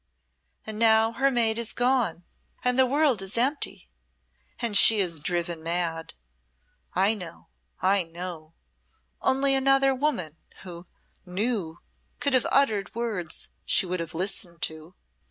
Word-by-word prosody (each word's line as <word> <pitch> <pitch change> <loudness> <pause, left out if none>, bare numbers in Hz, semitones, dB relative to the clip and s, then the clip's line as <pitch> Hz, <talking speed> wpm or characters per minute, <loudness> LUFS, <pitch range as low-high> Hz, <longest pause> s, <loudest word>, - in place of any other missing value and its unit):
And 215 -1 -6
now 225 0 +4
her 270 +4 +1
mate 230 -3 +2
is 235 -1 -3
gone 245 -9 0 0.4
and 250 +1 +2
the 260 - +5
world 280 -5 +2
is 195 +3 -3
empty, 275 +5 -1 0.7
and 230 -3 -1
she 220 +2 +8
is 170 -6 0
driven 170 0 -3
mad. 165 -1 -2 0.8
I 195 +4 +3
know, 180 -6 -10 0.3
I 195 +1 +4
know! 165 -1 -8 0.7
Only 270 +1 +2
another 270 0 +3
woman 250 - -2 0.3
who 175 -1 -10 0.4
knew 185 -3 -3 0.4
could 280 - 0
have 255 - +3
uttered 220 -9 +1
words 215 -8 -3
she - - +2
would 180 0 -3
have 165 0 -6
listened 175 -1 -3
to." 160 +3 -3
200 Hz, 135 wpm, -26 LUFS, 175-245 Hz, 0.8 s, she